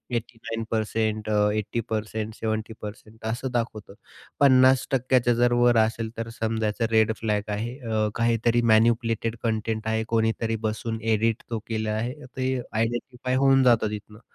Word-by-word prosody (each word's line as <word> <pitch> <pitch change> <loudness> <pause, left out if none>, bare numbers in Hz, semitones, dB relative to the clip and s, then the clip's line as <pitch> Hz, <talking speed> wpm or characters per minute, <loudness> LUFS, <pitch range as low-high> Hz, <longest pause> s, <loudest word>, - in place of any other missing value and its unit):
89%, 110 -2 -2
अ, 105 -1 +3
80%, 110 0 -3
70% 110 0 -6
असं 120 +4 -2
दाखवतं. 115 -4 -3 0.5
50%च्या 130 -2 +4
जर 120 0 +3
वर 120 -1 +4
असेल 110 0 +1
तर 115 0 -4
समजायचं 110 0 0
रेड 110 0 +4
फ्लॅग 105 -1 -1
आहे. 115 +5 -3
अ, 110 -4 0
काहीतरी 115 0 +2
मॅनिपुलेटेड 115 0 +2
कंटेंट 110 -1 -1
आहे 110 0 0
कोणीतरी 115 0 +1
बसून 110 +1 -4
एडिट 110 0 +1
तो 115 -2 -2
केला 110 -1 -2
आहे, 115 +4 -2 0.2
ते 130 0 0 0.2
आयडेंटिफाय 120 +3 -2
होऊन 135 0 +4
जातं 115 -4 +4
तिथनं. 105 0 -8
115 Hz, 130 wpm, -25 LUFS, 110-120 Hz, 0.5 s, 50%च्या